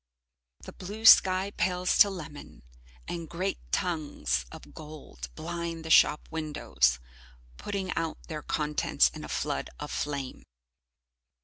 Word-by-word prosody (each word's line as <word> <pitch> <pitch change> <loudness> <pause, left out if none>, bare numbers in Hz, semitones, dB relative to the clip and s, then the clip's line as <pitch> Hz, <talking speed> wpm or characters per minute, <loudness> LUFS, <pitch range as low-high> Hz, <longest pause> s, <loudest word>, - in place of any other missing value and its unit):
The - - -9
blue 210 +4 -8
sky 190 -2 +7
pales 180 -2 0
to 205 - +8
lemon, 155 - -9 0.4
and 170 -2 -5
great 185 +4 -2
tongues 145 - -1
of 75 +3 -12
gold 150 - -10
blind 170 -1 -5
the 160 - -3
shop 150 - +5
windows, 150 - +1 0.6
putting 195 -2 -3
out 165 -1 -2
their 155 -2 -5
contents 150 0 +1
in - - -9
a - - -8
flood - - -2
of - - -6
flame. 140 -3 -4
160 Hz, 125 wpm, -29 LUFS, 150-185 Hz, 0.6 s, to